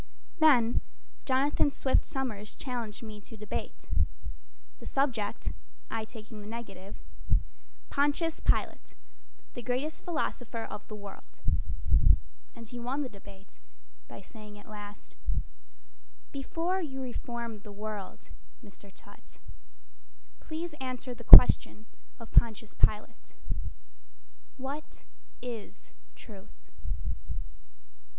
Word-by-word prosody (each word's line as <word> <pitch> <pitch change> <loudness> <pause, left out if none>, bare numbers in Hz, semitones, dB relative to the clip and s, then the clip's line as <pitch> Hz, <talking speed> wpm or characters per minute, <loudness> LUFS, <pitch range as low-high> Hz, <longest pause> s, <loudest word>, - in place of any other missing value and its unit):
Then 250 -7 +6 0.4
Jonathan 275 +2 +3
Swift 270 -1 +2
Somers 220 -6 -3
challenged 240 -5 -4
me 215 -2 -8
to 225 - -10
debate 210 -1 -5 0.9
The - - -8
subject, 240 -7 0 0.4
(I 225 -1 -1
taking 215 -1 -10
the 205 - -9
negative): 200 -4 -7 0.9
"Pontius 295 +3 +2
Pilate, - - +1 0.6
the 245 - -6
Greatest 255 +6 -2
Philosopher 245 -8 -2
of 210 -1 -7
the 215 - -7
World." 200 -1 -11 1.2
And 230 -1 -10
he 245 +2 -7
won 260 +5 -1
the 260 - -4
debate 200 - -14 0.5
by - - -10
saying 210 +1 -11
at 205 - -15
last, 205 -1 -10 1.2
"Before 335 +7 -1
you 270 -5 -4
reform 235 -3 -4
the 205 0 -11
world, 210 -1 -6 0.4
Mr. 200 -1 -14
Tutt - - -15 1.0
Please 325 +1 -5
answer 255 0 -4
the 240 0 -11
question 220 -2 +10 0.3
of 230 - -10
Pontius 225 -1 +3
Pilate: 135 - 0 1.2
"What 280 +3 -6 0.4
is 225 - -8 0.2
Truth?" - - -14
230 Hz, 100 wpm, -31 LUFS, 210-265 Hz, 1.2 s, question